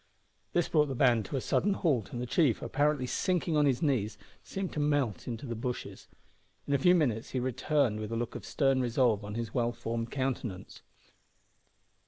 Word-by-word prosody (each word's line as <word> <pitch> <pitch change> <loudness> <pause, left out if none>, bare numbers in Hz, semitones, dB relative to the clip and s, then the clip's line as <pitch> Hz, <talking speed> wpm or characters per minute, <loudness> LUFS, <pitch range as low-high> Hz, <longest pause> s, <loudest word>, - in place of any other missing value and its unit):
This 175 - +2
brought 150 -2 +3
the 135 - -3
band 120 -4 +3
to - - -5
a 135 - 0
sudden 205 +9 +1
halt 140 - 0
and 120 - -4
the 125 - -2
chief, 135 - +2
apparently 145 -1 +1
sinking 175 +4 0
on 150 -1 +4
his 135 +4 +1
knees, 115 -8 0 0.3
seemed 190 -1 -4
to - - -3
melt 145 - 0
into 120 +2 -5
the 120 - -3
bushes. 120 +2 -5 0.6
In 140 - 0
a 140 - +3
few 180 +6 +5
minutes 120 -10 0
he 130 - -2
returned 130 -2 +1
with 110 0 -5
a - - -1
look 120 0 -3
of - - -7
stern 135 -2 +1
resolve 120 -3 +2
on 105 +1 -6
his 115 -1 -4
well 120 -1 +1
formed 115 0 -4
countenance. 130 -8 -4
130 Hz, 195 wpm, -30 LUFS, 115-145 Hz, 0.6 s, few